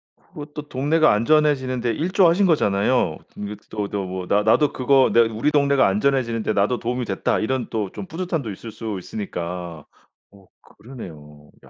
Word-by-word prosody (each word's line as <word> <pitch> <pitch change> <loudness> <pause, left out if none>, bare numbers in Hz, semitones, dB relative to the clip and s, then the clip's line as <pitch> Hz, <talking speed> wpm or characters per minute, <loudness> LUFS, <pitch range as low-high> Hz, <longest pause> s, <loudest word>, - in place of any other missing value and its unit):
그것도 150 0 -10
동네가 150 +3 +3
안전해지는데 130 0 +2
일조하신 180 - +3
거잖아요. 105 - +2 0.2
이거 105 +1 -5
또 105 -2 -3
또 100 -2 -3
뭐 90 0 -5
나 105 +1 +2
나도 140 +7 +3
그거 135 +1 +3
'내가 115 -1 +4
우리 115 +8 0
동네가 140 -2 +3
안전해지는데 115 +1 0
나도 105 +5 +1
도움이 125 +1 -2
됐다.' 95 -3 -1
이런 130 +3 -1
또 105 -4 -2
좀 - - -7
뿌듯함도 165 - -3
있을 110 +4 -9
수 110 -1 -5
있으니까. 90 -5 -6 0.5
어 100 -1 -19 0.2
그러네요. 75 - -12 0.2
야. - - -17
115 Hz, 365 characters per minute, -22 LUFS, 100-140 Hz, 0.5 s, 내가